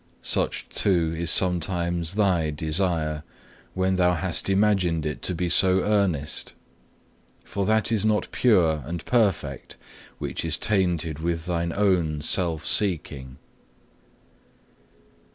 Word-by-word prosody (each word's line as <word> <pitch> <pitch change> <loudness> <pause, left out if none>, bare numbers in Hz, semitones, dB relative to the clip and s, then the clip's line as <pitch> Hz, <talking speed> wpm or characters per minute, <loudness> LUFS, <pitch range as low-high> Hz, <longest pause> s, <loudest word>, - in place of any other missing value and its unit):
Such, - - -1
too, 85 -5 +1
is 85 0 0
oftentimes 85 0 -2
thy 90 -7 +1
desire, 80 0 -1 0.5
when 95 0 0
thou 90 -1 +3
hast 90 +2 -2
imagined 95 -5 +1
it 75 -2 -4
to 90 - -2
be 90 +2 -2
so 95 +2 +4
earnest. 95 -9 0 0.9
For 100 0 -3
that 110 +1 +2
is 110 -3 +2
not 110 -1 0
pure 85 -11 +2
and 85 +1 -6
perfect 95 - -1 0.4
which - - -4
is 80 -1 +2
tainted 85 -6 0
with 85 0 -3
thine 85 -1 -2
own 85 -6 +1
self 80 -2 0
seeking. 70 -8 -1
85 Hz, 115 wpm, -24 LUFS, 80-95 Hz, 0.9 s, so